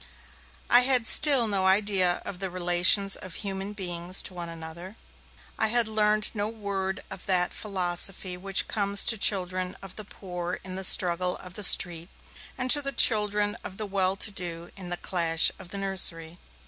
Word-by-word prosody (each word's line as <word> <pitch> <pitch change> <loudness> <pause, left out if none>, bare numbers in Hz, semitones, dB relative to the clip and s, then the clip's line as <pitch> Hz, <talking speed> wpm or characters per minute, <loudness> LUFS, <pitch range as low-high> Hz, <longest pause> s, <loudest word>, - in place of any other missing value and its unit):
I 245 - +4
had 250 -2 0
still 270 -2 +4
no 195 -3 -2
idea 190 -2 +1
of 180 - -9
the 190 0 -6
relations 180 +3 +2
of 185 -3 -11
human 195 0 -7
beings 180 -2 -3
to - - -5
one 175 -1 -9
another; 165 +4 -11 0.6
I 220 - +2
had 235 0 -1
learned 215 -1 -1
no 210 -1 -4
word 200 -3 -6
of - - -11
that 180 -2 +1
philosophy 185 -1 0
which 195 +2 -1
comes 200 -1 0
to 225 - +3
the - - -9
children 185 -2 0
of 195 -1 -13
the 215 - -7
poor 180 -3 -8
in 185 -1 -8
the 190 - -5
struggle 180 -1 +4
of 180 -1 -13
the 210 - -8
street 175 -3 +6 0.5
and 255 0 +1
to 290 - +4
the 275 -1 -5
children 210 -4 +3
of 190 - -10
the 215 - -6
well 190 -1 -3
to 210 +2 -4
do 170 -3 -6
in 185 -3 -11
the 175 - -6
clash 165 -3 -1
of 185 -2 -14
the 200 - -8
nursery. 175 -4 0
190 Hz, 185 wpm, -24 LUFS, 180-210 Hz, 0.6 s, street